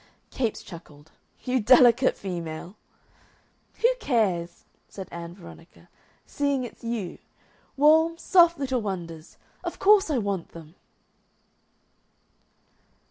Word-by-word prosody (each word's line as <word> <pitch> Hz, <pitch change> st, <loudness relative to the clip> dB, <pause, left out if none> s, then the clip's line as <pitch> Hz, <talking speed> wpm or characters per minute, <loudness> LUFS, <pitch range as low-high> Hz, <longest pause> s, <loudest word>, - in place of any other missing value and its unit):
Capes 235 Hz, -5 st, -2 dB
chuckled. 155 Hz, -3 st, -13 dB, 0.3 s
"You 255 Hz, 0 st, 0 dB
delicate 250 Hz, +2 st, +5 dB
female!" 170 Hz, -1 st, -6 dB, 1.1 s
"Who -, -, +7 dB
cares," 195 Hz, -, -1 dB, 0.2 s
said 190 Hz, -2 st, -9 dB
Ann 170 Hz, 0 st, -8 dB
Veronica, 170 Hz, -2 st, -15 dB, 0.4 s
"seeing 280 Hz, -2 st, -1 dB
it's 240 Hz, -, -10 dB
you? 230 Hz, -6 st, -4 dB, 0.6 s
Warm, 320 Hz, +3 st, +4 dB
soft 340 Hz, -1 st, +4 dB
little 265 Hz, -3 st, -2 dB
wonders! 170 Hz, -6 st, -7 dB, 0.3 s
Of -, -, -5 dB
course 405 Hz, -2 st, +4 dB
I 295 Hz, -, 0 dB
want 200 Hz, -6 st, -3 dB
them." 160 Hz, -1 st, -12 dB
220 Hz, 100 wpm, -25 LUFS, 170-270 Hz, 1.1 s, Who